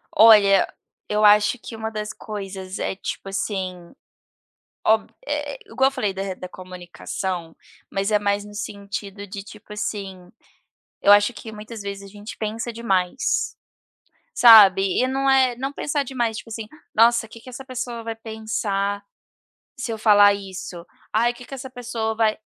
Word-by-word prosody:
Olha, 210 -3 +7 0.4
eu 210 0 0
acho 210 +3 +5
que 230 - -9
uma 220 0 -4
das 215 -1 -4
coisas 195 -3 -7
é, - - -2
tipo 195 0 -6
assim, 185 -3 -4 0.9
ob 220 0 +3 0.2
eh, - - -3
igual 265 -8 +2
eu - - -16
falei 245 -8 -1
da 190 0 -4
da 185 - -8
comunicação, 180 -1 -6 0.3
mas 195 +2 -1
é 210 - +4
mais 205 0 0
no 205 - -12
sentido 200 -1 -6
de, 195 +1 -7
tipo 210 0 -12
assim, 195 -4 -5 0.7
eu - - +4
acho 205 +4 +5
que 220 +1 -9
muitas 215 +1 -9
vezes 200 0 -6
a 195 - -13
gente 210 +1 -9
pensa 225 +2 -3
demais, 195 -1 0 0.8
sabe? 205 - +9 0.2
E 255 - +3
não 270 +1 +1
é 260 -2 +4
não 270 +2 -3
pensar 290 0 -1
demais, 240 -4 -1
tipo 225 - -10
assim: 220 0 -5 0.3
"Nossa, 230 0 +4
que 230 +1 -12
que 255 - -14
essa 260 +2 -8
pessoa 245 -3 -5
vai 225 0 -5
pensar 215 -3 -2 0.8
se 245 -1 -4
eu 220 - -4
falar 205 -2 +6
isso? 190 -3 -7 0.3
Ai 235 +3 +2
que 245 - -12
que 270 - -9
essa 265 0 -8
pessoa 235 -3 -3
vai" 220 -1 +2
210 Hz, 160 wpm, -23 LUFS, 195-230 Hz, 0.9 s, sabe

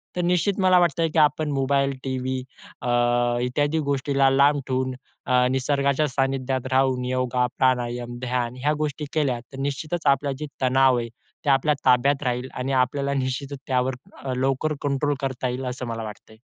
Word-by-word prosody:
तर 180 - 0
निश्चित 180 +3 +1
मला 185 -1 +5
वाटतंय, 165 -1 +2
की 160 - +1
आपण 150 0 +2
मोबाईल, 140 0 +1
टीव्ही, 130 0 -2 0.4
अ, 125 - -4 0.5
इत्यादी 145 +5 0
गोष्टीला 140 0 +2
लांब 140 +2 +4
ठेवून 130 0 -1 0.3
अ, 125 -1 +3
निसर्गाच्या 140 +2 +1
सानिध्यात 135 -1 -1
राहून 130 -1 +2
योगा, 125 0 0
प्राणायाम, 120 -1 0
ध्यान 125 -1 -2
ह्या 150 +1 +3
गोष्टी 150 0 -2
केल्या, 140 -6 +1
तर 125 +3 -13
निश्चितच 150 +4 -3
आपलं 140 +1 -3
जे 150 - -3 0.2
तणाव 130 0 +4
आहे 115 - -3 0.4
ते - - +2
आपल्या 140 +2 +3
ताब्यात 140 +3 +3
राहील 125 +1 -1
आणि 130 +2 -3
आपल्याला 140 +2 -2
निश्चितच 135 +2 -4
त्यावर 130 0 +1 0.3
अ, 130 -2 -2
लवकर 135 +4 0
कंट्रोल 145 +1 0
करता 130 -1 -2
येईल, 130 +2 -4
असं 125 0 -4
मला 115 -1 -4
वाटतंय. 110 0 -10
135 Hz, 165 wpm, -24 LUFS, 125-145 Hz, 0.5 s, मला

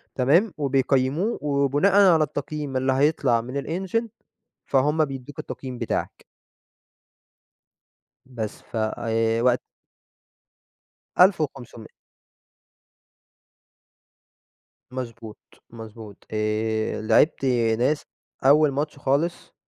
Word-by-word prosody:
تمام، 165 - +3
وبيقيموه 135 - +1
وبناءً 145 +7 +3
على 160 - +3
التقييم 145 -1 -4
اللي 130 +1 +1
هيطلع 135 -4 +2
من 130 +4 -4
الEngine 190 +7 -2 0.6
فهُم 150 +4 +2
بيدوا 135 -3 -7
لك 145 - -15
التقييم 130 -2 -7
بتاعك. 115 - -3 2.0
بس 115 -5 -6
فوقت 115 +2 0 1.6
1500. 145 - +1 3.0
مضبوط، 115 -4 -7 0.3
مضبوط، 110 -2 -11
آآ، 110 +1 -1
لاعبت 115 +6 +3 0.3
ناس 145 +5 +1 0.4
أول 150 +1 +5
ماتش 145 +2 -3
خالص 140 +5 -1
135 Hz, 75 wpm, -24 LUFS, 115-150 Hz, 3.0 s, أول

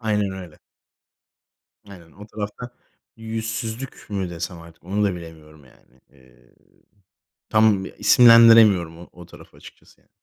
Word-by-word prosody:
Aynen 105 -3 -2
öyle. 90 -5 -11 1.3
Aynen 85 -5 -15
o 105 +2 -14
tarafta 105 +3 -8 0.5
yüzsüzlük 115 +2 -7
mü 95 -3 -4
desem 85 +1 -7
artık 85 0 -18
onu 100 +3 -2
da 100 -2 -1
bilemiyorum 80 -3 -14
yani, 65 0 -26
eee, 65 -2 -26 0.9
tam 110 -3 +2
isimlendiremiyorum 115 -7 +5
o 85 - -14
o 90 -1 -15
tarafı - - -18
açıkçası - - -18
yani. - - -37
95 Hz, 125 wpm, -21 LUFS, 85-110 Hz, 1.3 s, isimlendiremiyorum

